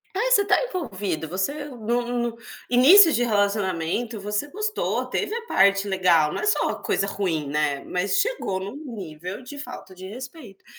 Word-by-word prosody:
Ah, 380 - -3
você 415 - +6
está 400 0 +2
envolvido, 205 - -4
você 195 - -2
no 240 -1 -1
no 240 -1 -2 0.3
início 315 - +8
de 245 - +2
relacionamento 205 0 0
você 210 +7 -3
gostou, 425 +5 -2
teve - - -2
a 465 0 -4
parte 200 - +3
legal, 180 -6 +3
não - - -3
é - - -2
só 420 - +1
coisa 195 - 0
ruim, 170 -7 -2
né, 145 -1 0
mas 180 - -1
chegou 405 - -1
no 195 +6 -6 0.2
nível 180 0 -7
de 285 +3 -10
falta 250 -8 -9
de 185 +1 -10
respeito. 250 - -10
210 Hz, 165 wpm, -24 LUFS, 185-275 Hz, 0.3 s, início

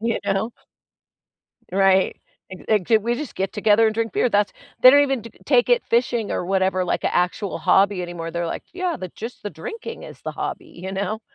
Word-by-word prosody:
You 230 +1 0
know? 200 +3 0 1.2
Right, 190 0 +3 0.3
"Ac 185 - -10 0.3
act 215 - +4
we 235 +2 0
just 295 -3 -6
get 190 0 -2
together 215 +1 +4
and 220 - 0
drink 225 -2 -1
beer, 250 - +2
that's" 205 -1 +1 0.3
they 255 - +11
don't 285 +1 +6
even 270 -4 0
t 230 - -9
take 485 - +3
it - - +3
fishing 235 -2 +1
or - - -2
whatever, 190 0 +1
like, - - -1
a - - +1
actual 180 +3 0
hobby 195 -1 +3
anymore, 170 -1 -5
they're 170 0 -2
like, - - -5
"Yeah, 360 -2 -2
the 185 - -6
just 230 +7 -9
the 205 - -4
drinking 450 - -7
is - - -12
the - - -4
hobby." - - -5
You 185 +2 -8
know? 205 +3 -2
205 Hz, 205 wpm, -22 LUFS, 190-235 Hz, 1.2 s, they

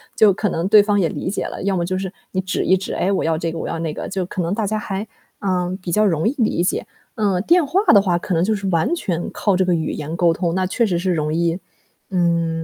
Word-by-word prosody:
就 215 -2 +6
可 210 +2 -1
能 170 +1 -1
对 210 0 +7
方 205 -1 +1
也 170 -4 +2
理 - - -4
解 200 - -2
了。 - - -6
要 195 0 +1
么 175 -2 0
就 185 +1 -2
是 190 -1 -4 0.2
你 185 - -1
指 190 - -2
一 190 - +4
指 190 - -5
“哎， 190 - 0
我 195 - 0
要 165 0 +1
这 165 0 -2
个， 165 - -6
我 - - -4
要 165 - -3
那 160 -2 -3
个”， - - -5
就 190 -1 -2
可 185 - -3
能 170 +3 -1
大 210 0 -1
家 215 +2 -1
还， 205 0 -4 0.3
嗯， 185 -2 -1
比 180 - -5
较 215 +5 +3
容 165 -3 +1
易 270 - -4
理 220 -8 +1
解。 180 - -1 0.3
嗯， 200 -4 +1
电 340 +5 +4
话 365 +7 +2
的 200 - +7
话 180 -3 +1
可 180 - -3
能 165 0 +2
就 220 +4 +1
是 200 -2 -3
完 170 - +1
全 175 - -2
靠 200 -3 +1
这 190 - +2
个 180 -1 +1
语 160 -2 -1
言 155 +2 -5
沟 170 -2 +3
通， 170 0 -1
那 185 +1 0
确 230 +6 +1
实 180 -5 0
是 185 +1 0
容 155 -2 -1
易， 170 +1 +1 0.5
嗯， 170 -3 +1
185 Hz, 305 characters per minute, -20 LUFS, 170-200 Hz, 0.5 s, 对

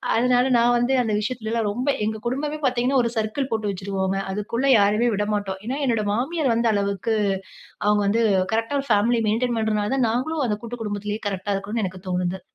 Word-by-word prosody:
அதனால 245 +2 +3
நான் 240 +1 +4
வந்து 240 +2 +1
அந்த 225 -3 -1
விஷயத்திலல்லாம் 225 0 -2
ரொம்ப 250 +6 -2
எங்க 220 +1 -1
குடும்பமே 290 +5 -2
பாத்தீங்கன்னா 255 +1 +2
ஒரு 235 - 0
சர்க்கிள் 225 +5 -1
போட்டு 220 -2 -1
வச்சுருவோங்க. 190 0 -2
அதுக்குள்ளே 220 +6 -2
யாரையுமே 210 +4 +3
விடமாட்டோம். 205 -2 -2
ஏன்னா 260 +4 -2
என்னுடைய 230 -4 +1
மாமியார் 270 +3 0
வந்து 230 -1 +2
அளவுக்கு 200 +2 -1 0.7
அவுங்க 210 0 +3
வந்து 225 +3 +2 0.3
கரெக்ட்டா 225 +6 0
ஒரு 275 - -10
ஃபேமிலி 230 +3 +3
மெயின்டெயின் 235 +3 0
பண்றதனால 215 0 0
தான் 255 - +2
நாங்களும் 275 +5 -1
அந்த 210 - 0
கூட்டு 235 +1 -7
குடும்பத்லயே 210 0 -3
கரெக்ட்டா 200 +1 -2
இருக்கணுன் 210 +3 -3
எனக்கு 185 0 -5
தோணுது. 180 +1 -1
225 Hz, 175 wpm, -23 LUFS, 205-245 Hz, 0.7 s, நான்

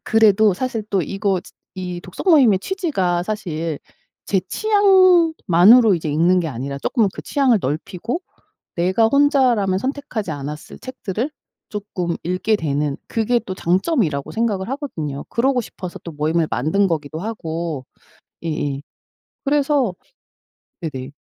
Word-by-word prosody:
그래도 215 -2 +5
사실 240 0 -3
또 190 -3 +1
이거 195 +2 -1
지 - - -17 0.3
이 180 -1 -5
독서 180 - -8
모임의 275 - +6
취지가 195 - -1
사실 170 -6 -3 0.5
제 190 -2 +1
취향만으로 335 - +5
이제 160 -2 -3
읽는 175 +4 +3
게 165 - -2
아니라 140 +1 -5
쪼끔 225 - +1
그 - - -7
취향을 260 -7 +2
넓히고 180 - -3 0.6
내가 185 +6 +3
혼자라면 255 -9 +3
선택하지 260 - -3
않았을 150 +1 -7
책들을 255 0 -4 0.4
쪼끔 190 -5 -3
읽게 185 +5 +1
되는 145 -4 -1
그게 235 +2 +1
또 185 - -4
장점이라고 180 - 0
생각을 215 -4 -1
하거든요. 165 - -4
그러고 250 +1 +1
싶어서 180 -3 -8
또 170 - -6
모임을 155 +2 0
만든 190 +10 +1
거기도 155 -2 -3
하고 165 - -4 0.6
예예 145 -4 -2 0.6
그래서 280 -6 +2 0.9
네네. 140 -4 -5
195 Hz, 295 characters per minute, -20 LUFS, 160-245 Hz, 0.9 s, 모임의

